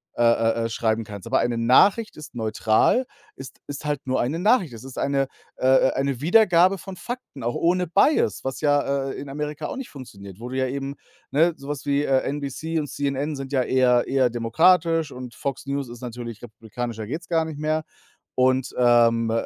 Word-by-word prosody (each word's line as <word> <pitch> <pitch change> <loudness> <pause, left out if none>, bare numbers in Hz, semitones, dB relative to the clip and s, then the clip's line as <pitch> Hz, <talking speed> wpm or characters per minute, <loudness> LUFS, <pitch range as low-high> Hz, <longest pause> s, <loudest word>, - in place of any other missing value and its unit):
äh, 120 - +1
äh, 115 0 +2
äh, - - -2
schreiben 115 0 0
kannst. 100 -2 -9
Aber - - +2
eine 120 -1 0
Nachricht 190 - +4
ist 155 - -10
neutral, 110 - +2 0.3
ist 135 0 -11
ist 145 +1 -7
halt 145 -2 -1
nur 130 - +1
eine 145 +7 -1
Nachricht. 195 - +2
Es 115 - -10
ist 130 -1 -10
eine, 135 -1 0 0.3
äh, 130 - 0 0.2
äh, - - -3
eine 135 -2 -1
Wiedergabe 185 +1 +4
von 190 +1 -9
Fakten, 240 - -8
auch 120 +1 -1
ohne 180 +2 +1
Bias, 200 - +2
was 135 0 -4
ja, 140 -2 +1
äh, - - -4
in 140 - -8
Amerika 150 +1 -4
auch - - -6
nicht 270 - -6
funktioniert, 100 -8 -11
wo 120 +2 -7
du 130 - -4
ja 130 0 +1
eben 140 +1 -4 0.4
Ne, 165 +4 +3
sowas 140 0 -6
wie, 140 0 +1
äh, 135 -2 +2
NBC 145 +3 -3
und 150 - -3
CNN 140 +2 -2
sind 135 -1 -7
ja 130 - +3
eher 125 -1 +3
eher 130 -2 +2
demokratisch 160 +7 +2
und 125 -1 -9
Fox 140 -2 -4
News 140 -2 -3
ist 120 0 -10
natürlich 120 -2 -7
republikanischer 115 0 -6
geht's 155 +8 -5
gar 165 -2 +2
nicht 155 -2 -7
mehr. 155 +1 0 0.5
Und, 130 0 +1
ähm 115 -2 +4
135 Hz, 195 wpm, -24 LUFS, 120-155 Hz, 0.5 s, Nachricht